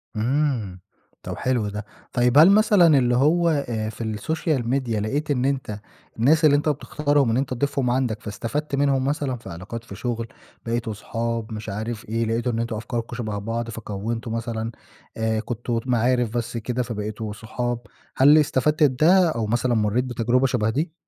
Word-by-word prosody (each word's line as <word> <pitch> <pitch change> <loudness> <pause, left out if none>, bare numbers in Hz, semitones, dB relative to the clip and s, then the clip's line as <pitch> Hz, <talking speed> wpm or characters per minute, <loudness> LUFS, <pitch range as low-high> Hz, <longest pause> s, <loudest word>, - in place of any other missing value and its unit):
امم، 120 -5 0 0.4
طَب - - -5
حلو 125 -5 0
ده. 105 0 -6 0.3
طيب 125 +2 +3
هل 165 +5 +9
مثلًا 200 -7 +5
اللي 120 -1 +2
هو 165 +6 +3
آآ، 120 -8 -1
في 110 -1 -4
الsocial 160 -1 -1
media 120 -1 -1
لقيت 145 +8 -1
إن 130 -1 +1
أنت 130 -6 -2 0.4
الناس 155 +7 +4
اللي 145 -1 +6
أنت 150 +1 +1
بتختارهم 145 -2 +1
إن 115 - +1
أنت 130 -1 -1
تضيفهم 135 0 0
عندك 120 -4 0
فاستفدت 115 +9 -3
منهم 140 -1 +2
مثلًا 140 -2 -1
في 105 - -11
علاقات 95 +7 -7
في 100 - -10
شغل، 115 -1 -3 0.4
بقيتوا 115 -1 -2
أصحاب، 115 +1 -3
مش 105 0 -6
عارف 110 +1 -5
إيه، 115 +1 0
لقيتوا 115 +2 0
إن 115 - -2
أنتم 115 -1 -2
أفكاركم 115 +1 -4
شبه 110 -4 -3
بعض، 115 +3 -3
فكوّنتوا 115 +1 -4
مثلًا 115 0 -3 0.5
آآ، 110 -1 0
كنتم 120 0 -3
معارف 125 -1 +2
بس 115 0 -3
كده 125 +2 -2
فبقيتوا 110 -1 -5
صحاب، 120 +2 -3 0.4
هل 145 +4 +7
استفدت 150 +1 +2
بده 165 +7 +5
أو 115 -8 -1
مثلًا 120 +2 +1
مرّيت 110 +2 +1
بتجربة 120 +2 +1
شبه 115 -4 0
دي؟ 155 +8 -1
120 Hz, 170 wpm, -23 LUFS, 110-140 Hz, 0.5 s, هل